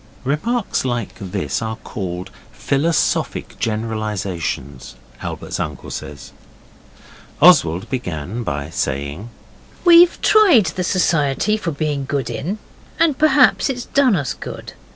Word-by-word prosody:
(Remarks 195 Hz, -, -1 dB
like 120 Hz, -4 st, -2 dB
this 95 Hz, +1 st, -3 dB
are 110 Hz, 0 st, -3 dB
called 95 Hz, -5 st, -6 dB, 0.2 s
philosophic 145 Hz, +7 st, -1 dB
generalizations, 105 Hz, -, -3 dB, 0.3 s
Albert's -, -, -5 dB
uncle 75 Hz, -3 st, -5 dB
says.) 75 Hz, -2 st, -8 dB, 1.1 s
Oswald 85 Hz, +3 st, +5 dB
began 95 Hz, -, -4 dB
by 70 Hz, -7 st, -4 dB
saying 70 Hz, -, -3 dB, 0.6 s
'We've 345 Hz, 0 st, +7 dB
tried 375 Hz, -, +6 dB
the 185 Hz, -, -1 dB
society 175 Hz, +1 st, +1 dB
for 210 Hz, -5 st, -3 dB
being 145 Hz, -2 st, -2 dB
good 140 Hz, -1 st, -2 dB
in, 185 Hz, +9 st, -3 dB, 0.4 s
and 320 Hz, -4 st, +2 dB
perhaps 290 Hz, -3 st, +4 dB
it's 250 Hz, -2 st, -3 dB
done 270 Hz, -6 st, +3 dB
us 140 Hz, -6 st, -2 dB
good. -, -, -8 dB
130 Hz, 110 wpm, -19 LUFS, -, 1.1 s, We've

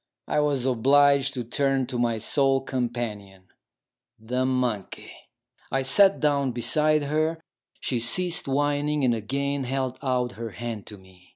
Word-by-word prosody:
I -, -, 0 dB
was 145 Hz, -4 st, 0 dB
obliged 140 Hz, +3 st, +3 dB
to 125 Hz, -, -3 dB
turn 135 Hz, +2 st, 0 dB
to 125 Hz, -1 st, -4 dB
my 120 Hz, -2 st, 0 dB
sole 135 Hz, +4 st, +2 dB
companion, 115 Hz, -7 st, -4 dB, 0.7 s
the 125 Hz, +3 st, -2 dB
monkey. 125 Hz, -6 st, -3 dB, 0.6 s
I 135 Hz, +1 st, 0 dB
sat 195 Hz, +9 st, +5 dB
down 140 Hz, -4 st, +1 dB
beside 150 Hz, +6 st, +2 dB
her; 155 Hz, +3 st, -1 dB, 0.4 s
she 125 Hz, -, -1 dB
ceased 165 Hz, +10 st, +2 dB
whining, 145 Hz, +1 st, 0 dB
and 120 Hz, -, +3 dB
again 140 Hz, +5 st, -2 dB
held 130 Hz, 0 st, -3 dB
out 125 Hz, -3 st, -1 dB
her 115 Hz, -1 st, -7 dB
hand 115 Hz, -3 st, -6 dB
to 105 Hz, -, -9 dB
me. 95 Hz, -1 st, -20 dB
130 Hz, 145 wpm, -25 LUFS, 120-140 Hz, 0.7 s, sat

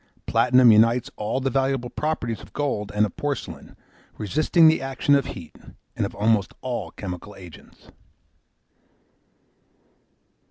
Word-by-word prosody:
Platinum 125 Hz, -1 st, +5 dB
unites 115 Hz, +3 st, +3 dB
all 105 Hz, +5 st, -2 dB
the 135 Hz, 0 st, -1 dB
valuable 135 Hz, -2 st, -1 dB
properties 120 Hz, -8 st, -3 dB
of -, -, -15 dB
gold 120 Hz, -8 st, -2 dB
and 105 Hz, +1 st, +3 dB
of 105 Hz, -, -8 dB
porcelain, 145 Hz, -1 st, -5 dB, 0.4 s
resisting 155 Hz, -, +3 dB
the 160 Hz, -3 st, +3 dB
action 135 Hz, +1 st, 0 dB
of 140 Hz, -2 st, +3 dB
heat, -, -, -9 dB, 0.4 s
and -, -, -1 dB
of -, -, -13 dB
almost 105 Hz, -2 st, +1 dB
all 120 Hz, -9 st, -4 dB
chemical 90 Hz, +2 st, -8 dB
agents. 90 Hz, -4 st, -15 dB
120 Hz, 125 wpm, -23 LUFS, 105-135 Hz, 0.4 s, Platinum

